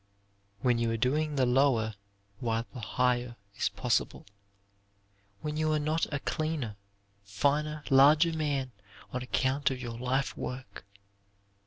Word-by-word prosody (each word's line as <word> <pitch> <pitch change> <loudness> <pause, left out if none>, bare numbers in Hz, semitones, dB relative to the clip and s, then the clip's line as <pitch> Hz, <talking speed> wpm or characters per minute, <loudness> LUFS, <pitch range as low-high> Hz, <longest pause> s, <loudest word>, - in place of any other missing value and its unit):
When 120 -2 +2
you 115 0 +1
are 115 - 0
doing 150 +6 +1
the 130 -2 +3
lower 125 -3 +3 0.5
while 115 -1 -1
the 125 - -7
higher 120 +1 0 0.2
is - - +1
possible. 105 +2 -1 1.2
When 150 0 -3
you 155 0 +1
are 155 - +2
not 155 +2 0
a 140 - -1
cleaner, 155 -9 -2 0.5
finer, 145 +9 0
larger 150 +5 +6
man 140 -4 -1 0.4
on 125 - -2
account 130 +3 +1
of 130 -2 -4
your 120 -2 -6
life 130 +2 0
work. 125 -7 -7
130 Hz, 135 wpm, -30 LUFS, 120-150 Hz, 1.2 s, larger